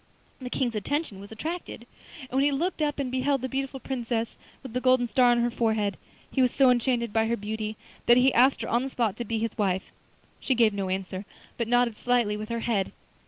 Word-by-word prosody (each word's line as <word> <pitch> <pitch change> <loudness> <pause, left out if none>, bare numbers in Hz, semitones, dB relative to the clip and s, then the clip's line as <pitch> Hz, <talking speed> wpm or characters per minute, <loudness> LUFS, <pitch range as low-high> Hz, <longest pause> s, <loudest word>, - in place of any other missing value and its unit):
The 250 - -5
King's 250 -2 -1
attention 225 0 -2
was 200 +2 -11
attracted, 310 0 -5 0.4
and 260 - -11
when 265 +2 +2
he 290 - +3
looked 335 +5 -1
up 295 -1 0
and 270 -3 -2
beheld 265 +1 +1
the 260 - -2
beautiful 270 0 -3
Princess 235 -3 -3 0.3
with 260 -4 -8
the 250 - -1
golden 255 -1 +4
star 250 0 +4
on 240 0 +4
her 240 0 +1
forehead, 220 -4 0 0.4
he 265 - +1
was 250 - +5
so 260 0 +4
enchanted 240 -2 +1
by 225 0 +2
her 235 +1 0
beauty 215 +1 -4 0.3
that 240 - +7
he 255 +1 +5
asked 260 +3 +4
her - - -4
on 235 - +2
the 270 - -3
spot 230 -6 0
to 240 - -4
be 230 +1 -2
his 225 0 -2
wife. 190 -2 0 0.5
She 265 - 0
gave 225 -3 +4
no 195 -2 -2
answer, 190 0 -3 0.3
but 235 - -2
nodded 245 -2 +2
slightly 240 -4 +1
with 215 +1 -6
her 235 0 -2
head. 205 -6 0
240 Hz, 225 wpm, -27 LUFS, 220-260 Hz, 0.5 s, that